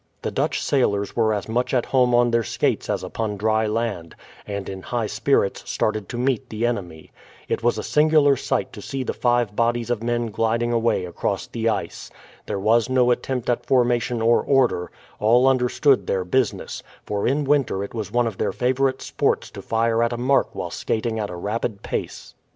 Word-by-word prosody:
The - - -2
Dutch - - -1
sailors 100 -7 +1
were 110 -2 +2
as 105 -2 -2
much 125 +4 0
at 125 - +1
home 125 -2 +3
on 120 0 +4
their 115 0 +3
skates 110 - -1
as - - -1
upon 110 -2 -3
dry 110 +1 +1
land, 105 -7 -3 0.3
and 100 -1 -4
in 95 -1 -6
high 120 +3 -2
spirits 110 0 0
started 110 -3 -1
to 120 - -5
meet 130 +1 0
the 110 +2 -2
enemy. 90 -9 -4 0.4
It - - -1
was 120 +1 +1
a - - -3
singular 150 -2 +4
sight - - -2
to - - -9
see 135 -1 -4
the - - -3
five 120 -4 +1
bodies 120 0 0
of 115 -3 -1
men 120 -1 -1
gliding 115 +2 0
away 115 -5 +1
across 85 - -3
the 115 0 -1
ice. 110 - -4 0.4
There - - -2
was 110 +4 +2
no 125 -1 +3
attempt 125 0 -2
at 120 - -1
formation 120 -2 +2
or 115 +1 +4
order; 125 -10 +2 0.3
all 120 +5 +4
understood 130 +2 +3
their 95 -1 0
business, 130 +6 -1 0.2
for 100 -1 -1
in 140 +4 +1
winter 135 -8 +1
it 100 - -7
was 110 -4 -4
one 120 +1 +2
of 110 -5 -4
their - - 0
favourite 130 +1 0
sports - - -1
to - - -8
fire 115 0 +1
at 115 +1 +1
a - - -3
mark 130 +3 +1
while - - -4
skating 110 0 -2
at 105 -1 -2
a 90 - -6
rapid 105 +3 -3
pace. - - -5
115 Hz, 195 wpm, -23 LUFS, 110-125 Hz, 0.4 s, on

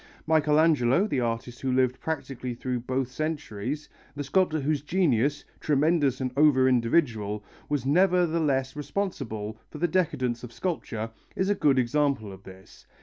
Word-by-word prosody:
Michelangelo, 155 -1 +3
the 145 -11 -1
artist 120 0 -3
who 130 - -1
lived 130 0 +2
practically 135 -6 -4
through 125 +1 -3
both 130 +1 -2
centuries, 145 -2 -4 0.3
the 145 - -3
sculptor 160 +2 +1
whose 145 0 0
genius, 145 -4 +1
tremendous 145 -2 +2
and 130 -1 -2
over 140 -3 +5
individual, 115 -5 +1 0.3
was 145 -4 -1
nevertheless 160 -5 +2
responsible 130 - -4
for - - -9
the 175 - +1
decadence 130 -9 0
of 120 - -8
sculpture, 115 -10 -3 0.2
is 190 +2 +1
a - - +5
good 150 -8 +2
example 130 -4 +1
of 95 - -13
this. 95 0 -15
135 Hz, 145 wpm, -27 LUFS, 120-155 Hz, 0.3 s, over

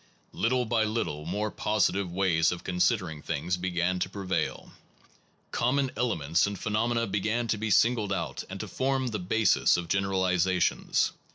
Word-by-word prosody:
1 - - -10
Little 125 +2 +2
by 115 -1 +1
little, 105 -9 -2
more 105 +4 -2
positive 100 -3 0
ways 85 -3 +2
of 90 - -5
con 90 - -4
sidering 80 -3 +1
things 85 +6 -1
began 90 0 -1
to - - -1
prevail. 95 -2 -3 0.8
Common 130 +2 +1
ele 120 0 0
ments 80 +5 +1
in 100 - -3
phenomena 115 +4 0
began 110 +4 -1
to 105 - 0
be 110 +1 -2
singled 110 0 +3
out 95 - -3
and - - -6
to - - -5
form 130 -1 -1
the 110 - -3
basis 95 +2 +3
of 85 -1 -4
generalizations. 95 -2 +1
100 Hz, 165 wpm, -28 LUFS, 90-110 Hz, 0.8 s, singled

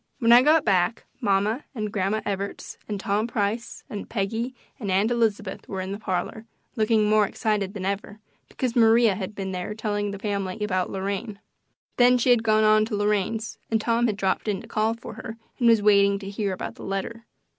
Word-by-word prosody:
When 230 -2 +3
I 240 +1 +9
got 305 +3 +4
back 190 +1 +1
mamma 210 +2 +1
and 215 -2 -3
Grandma 205 +2 0
Evarts 200 -1 -4
and 205 -2 -3
Tom 210 +2 0
Price 225 +1 -2
and 205 - -7
Peggy 225 +4 -2 0.2
and 205 -5 -4
Aunt 195 +5 +2
Elizabeth 220 -4 -1
were 190 - -4
in 185 +1 -4
the 200 - -5
parlor, 220 +3 -3 0.3
looking 220 -1 +2
more 210 -1 +4
excited 205 -2 -1
than 190 -2 -4
ever, 200 +2 -3 0.3
because 250 -3 -3
Maria 225 -2 +5
had 195 +1 -5
been 195 -1 -4
there 185 +3 -4
telling 205 -2 -2
the 200 - -5
family 200 -1 -3
about 185 -3 0
Lorraine. 200 +2 -4 0.6
Then 250 0 +6
she 245 +1 +3
had 240 -2 +5
gone 215 -1 +3
on 215 0 +5
to 220 -1 -3
Lorraine's 210 +2 -1
and 225 - +2
Tom 235 +2 +1
had 210 -3 -2
dropped 190 +1 -1
in 200 -3 0
to 230 - -13
call 220 +1 0
for 230 - -9
her 225 +1 -8 0.2
and 240 - +3
was 225 -3 +5
waiting 200 -1 +5
to 195 0 -7
hear 200 -1 -2
about 185 - -5
the - - -12
letter. 210 +4 -4
210 Hz, 200 wpm, -25 LUFS, 200-225 Hz, 0.6 s, I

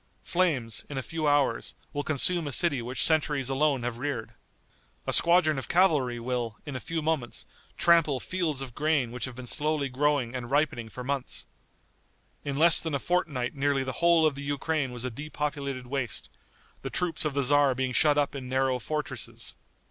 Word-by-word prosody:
Flames, 150 -11 0
in 145 - -5
a 130 - -2
few 160 0 -2
hours, 145 -1 +1 0.2
will 145 - -1
consume 155 +3 +1
a - - -3
city 145 -3 +2
which 125 +2 -1
centuries 150 -4 +2
alone 135 -2 +1
have 120 -1 -3
reared. 130 -4 -3 0.7
A - - -1
squadron 170 -4 +4
of 130 - -7
cavalry 150 -10 +3
will, 120 -2 -3
in 145 - -6
a - - -2
few 165 +4 -3
moments, 150 -6 -2 0.3
trample 165 -6 +4
fields 160 -6 -2
of 125 -3 -9
grain 150 -5 +1
which 125 - -4
have 130 -2 -8
been 130 0 -8
slowly 150 +2 -1
growing 135 -2 +1
and 125 -2 -5
ripening 135 -5 0
for 125 - -8
months. 135 0 -3 1.0
In 140 -1 -3
less 165 +2 +6
than 160 -3 -2
a - - 0
fortnight 145 -7 -1
nearly 140 -1 +1
the 130 - -3
whole 170 -1 +5
of 155 - +3
the 140 - -8
Ukraine 145 0 -1
was 125 0 -6
a 125 - -2
depopulated 140 -1 -4
waste, 125 -2 -3 0.5
the - - -4
troops 180 -2 -1
of 150 -3 -2
the 140 - +2
tzar 140 0 +4
being 130 0 -1
shut 150 +2 +4
up 145 -1 +1
in 130 -3 -6
narrow 130 -1 +1
fortresses. 150 +5 -4
140 Hz, 185 wpm, -28 LUFS, 130-155 Hz, 1.0 s, less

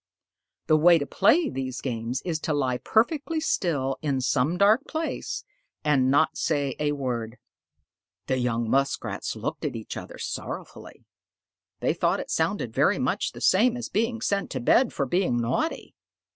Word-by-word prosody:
The 155 - +4
way 170 +2 +6
to 145 - -2
play 295 - +3
these 130 - -4
games 120 0 -3
is 165 -3 -1
to 155 -1 -1
lie 130 -3 0
perfectly 295 +8 +1
still 145 - -1
in 140 -3 0
some 130 +6 +1
dark 210 +7 +4
place 320 0 -3 0.4
and 140 -4 +3
not 145 +3 +3
say 145 -4 0
a 150 -1 +1
word." 125 -4 -3 0.9
The 130 - 0
young 120 -2 0
Muskrats 135 +4 -1
looked - - -4
at - - -2
each 110 -1 -6
other - - -8
sorrowfully. - - -7 0.8
They - - +2
thought - - +1
it - - -6
sounded - - -1
very - - +3
much - - -1
the - - -10
same 235 +6 +4
as 245 - -5
being 230 +2 -1
sent 200 -2 -1
to 130 - -3
bed 235 - +3
for 140 - -1
being 175 -3 +1
naughty. 120 - -2
145 Hz, 160 wpm, -26 LUFS, 130-200 Hz, 0.9 s, way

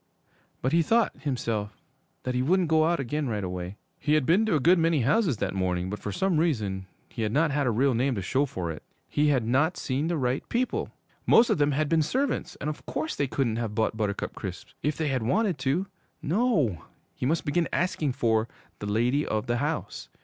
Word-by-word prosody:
But 130 - +1
he 170 +2 +4
thought, 225 +7 +2
himself, 115 -7 -2 0.5
that 125 - -2
he 125 - +1
wouldn't 175 +5 +2
go 160 -1 +4
out 170 0 +1
again 140 +3 -2
right 105 -4 -2
away. 90 +1 -5 0.2
He 150 0 +2
had 155 -4 +2
been 195 +9 +3
to 195 - +2
a - - +3
good 170 +6 +5
many 165 -3 +2
houses 155 - +2
that - - -2
morning, 90 -1 -1
but 105 - -4
for 105 - -4
some 180 - +1
reason 105 - -1 0.2
he - - -7
had 105 -1 0
not 150 +4 +2 0.2
a - - +4
real 130 +4 +2
name 125 +2 +1
to 100 - -2
show 135 +9 +1
for 90 -8 -4
it. 75 - -8 0.3
He 150 +1 +1
had 130 -6 +2
not 145 +9 +2
seen 140 +4 -1
the 170 -1 0
right 130 -1 0
people! 250 +2 -1 0.4
Most 230 - +6
of - - +1
them 145 0 +3
had 155 +2 +1
been 160 +1 +3
servants, 260 - -1
and - - -4
of 150 - -4
course 155 - -2
they 140 - 0
couldn't 125 -4 0
have 115 -3 -3
bought 110 0 +1
Buttercup 105 -2 -2
Crisps - - -7
if 150 0 -1
they 155 -2 0
had 130 -2 0
wanted 185 - +1
to. 140 +8 0 0.4
No 160 - +1 0.3
he 125 - -2
must 160 +3 0
begin 165 +3 +1
asking 160 -6 0
for 115 -3 +1 0.3
'the 105 - -5
lady 120 +7 +2
of 110 +1 -1
the 120 0 0
house.' 150 +5 -3
140 Hz, 220 wpm, -27 LUFS, 115-160 Hz, 0.5 s, Most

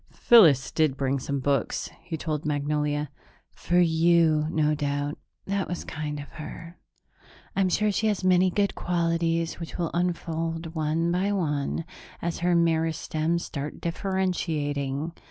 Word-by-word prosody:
"Phyllis 160 - +6
did 155 -4 +1
bring 135 0 0
some 140 +2 -2
books," 135 -2 -1
he 165 -1 -5
told 150 -1 -3
Magnolia. 150 0 -1 0.4
"For 175 - -1
you, 165 -2 +4
no 155 -2 +2
doubt. 145 0 -2 0.3
That 195 0 -1
was 175 - -4
kind 150 -2 -5
of 145 - -7
her. 165 +3 -9 0.8
I'm 195 -1 +2
sure 210 +4 +2
she 220 +2 0
has 205 -3 0
many 185 0 +4
good 200 +2 +1
qualities 165 -1 0
which 165 - -7
will 170 -3 -1
unfold 165 -2 -2
one 160 +1 0
by 190 +3 +1
one, 155 -4 -1 0.3
as 170 0 -3
her 175 0 +2
meristems 165 0 +1
start 145 0 -5
differentiating. 165 -6 -1
165 Hz, 135 wpm, -26 LUFS, 150-175 Hz, 0.8 s, Phyllis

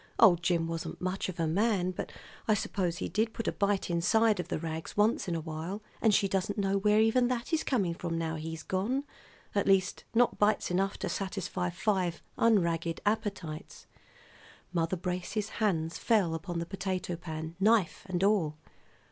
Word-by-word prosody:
Old 180 -7 +7
Jim 170 -1 +1
wasn't 165 -1 -4
much 185 +1 -2
of 180 -1 -7
a 165 - +2
man; 185 +2 +1
but 180 - -5 0.4
I 215 - +5
suppose 180 -4 -1
he - - -2
did 220 +4 0
put 230 - -3
a - - +3
bite 200 -1 0
inside 205 +5 +3
of 180 - -3
the - - -2
rags 160 +2 -5
once 210 0 +3
in 175 - -1
a - - -1
while, 160 +6 -5 0.2
and 220 - +5
she 205 -1 +3
doesn't 195 +2 -1
know 195 -1 +1
where 210 +1 +4
even 225 +3 +4
that 245 +3 -2
is 320 - +2
coming 200 -10 +1
from, 170 0 -3
now 165 -1 -1
he's 160 0 -5
gone. 225 +9 -1 0.5
At 200 - +1
least, 195 -1 +2
not 245 +1 +3
bites 210 -3 +2
enough 195 +2 +1
to - - -3
satisfy 190 -2 -2
five 180 -2 -1
unragged 170 -7 +2
appetites." 200 -7 -3 0.9
Mother 170 +1 0
Brace's 180 +4 -3
hands 165 -6 0
fell 205 -8 +2
upon 170 +2 -4
the 170 - -2
potato 185 -1 -3
pan, 160 -1 -6
knife 210 -3 +3
and 180 0 0
all. 185 -7 +2
185 Hz, 180 wpm, -30 LUFS, 170-210 Hz, 0.9 s, Old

